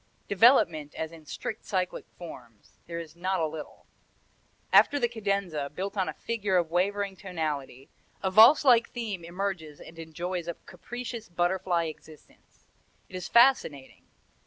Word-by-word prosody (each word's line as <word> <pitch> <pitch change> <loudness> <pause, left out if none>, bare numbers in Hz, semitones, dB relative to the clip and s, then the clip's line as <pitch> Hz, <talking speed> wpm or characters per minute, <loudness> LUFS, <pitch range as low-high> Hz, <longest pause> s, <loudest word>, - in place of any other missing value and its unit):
Development, 185 - +4
as 160 0 -4
in 160 -2 -14
strict 215 +9 -5
cyclic 185 -3 -2
forms, 120 -11 -12
there 170 0 -5
is 165 -1 -8
not 185 +2 -1
a 160 - +1
little. 155 -1 -8 0.9
After 290 - +6
the 240 -4 +2
cadenza, 200 -10 -2
built 190 +8 -5
on 190 -5 0
a 155 - -6
figure 210 -5 -1
of 170 -2 0
wavering 200 +2 0
tonality, 155 -8 -4 0.4
a 190 - 0
valse 230 +10 +8
like 235 -3 +5
theme 215 -7 -5
emerges 175 -4 -4
and 165 0 -13
enjoys 170 +2 -5
a 170 - -3
capricious, 240 -3 -7
butterfly 175 0 0
existence. 155 -1 -13 0.4
It - - -10
is 180 -1 -5
fascinating. 235 - +3
180 Hz, 145 wpm, -28 LUFS, 160-200 Hz, 0.9 s, valse